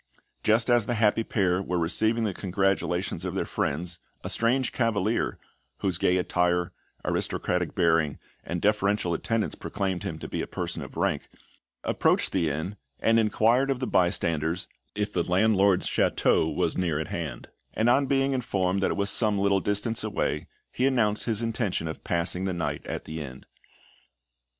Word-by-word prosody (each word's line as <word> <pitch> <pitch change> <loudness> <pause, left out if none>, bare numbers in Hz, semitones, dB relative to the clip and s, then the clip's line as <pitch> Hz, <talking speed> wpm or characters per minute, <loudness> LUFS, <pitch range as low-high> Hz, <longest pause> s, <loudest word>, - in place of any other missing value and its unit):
Just 110 - +3
as 120 -4 +3
the 120 - 0
happy 110 0 +3
pair 95 -4 +1
were 90 -2 -2
receiving 110 +7 +2
the 105 -3 0
congratulations 95 -2 -1
of 95 0 -3
their - - 0
friends, 85 +4 -2 0.2
a - - -4
strange 120 +2 +1
cavalier 115 -2 0 0.4
whose 90 -3 0
gay 90 - +3
attire, 90 -1 +1 0.3
aristocratic - - -1
bearing, 80 -4 +2 0.3
and 85 0 -4
deferential 100 -3 +2
attendants 115 +6 -1
proclaimed 95 -4 -3
him 80 - -4
to - - -7
be - - -3
a - - -4
person - - -4
of - - -9
rank - - -1 0.5
approached - - +2
the 85 -4 +1
inn, 80 +8 -4 0.2
and 115 0 +4
inquired 115 +5 +3
of 135 - +1
the 130 - -1
bystanders 85 -4 +1 0.3
if 105 0 -2
the - - +1
landlord's 100 0 +3
château 80 - +2
was - - 0
near 85 -5 0
at 80 -1 -3
hand; 75 -8 -5 0.3
and 110 - +2
on 135 +3 +4
being 135 0 +2
informed 95 -7 0
that - - +2
it - - -2
was 100 -1 +3
some 105 -2 +3
little 100 0 +3
distance 105 +4 0
away, 85 -7 -2 0.2
he 130 - +1
announced 110 -6 +1
his 115 -1 +2
intention 110 -7 -1
of 80 - -6
passing 85 +2 0
the 95 - -1
night 85 - -2
at - - -4
the 80 +1 -5
inn. 65 -2 -9
95 Hz, 170 wpm, -27 LUFS, 85-110 Hz, 0.5 s, and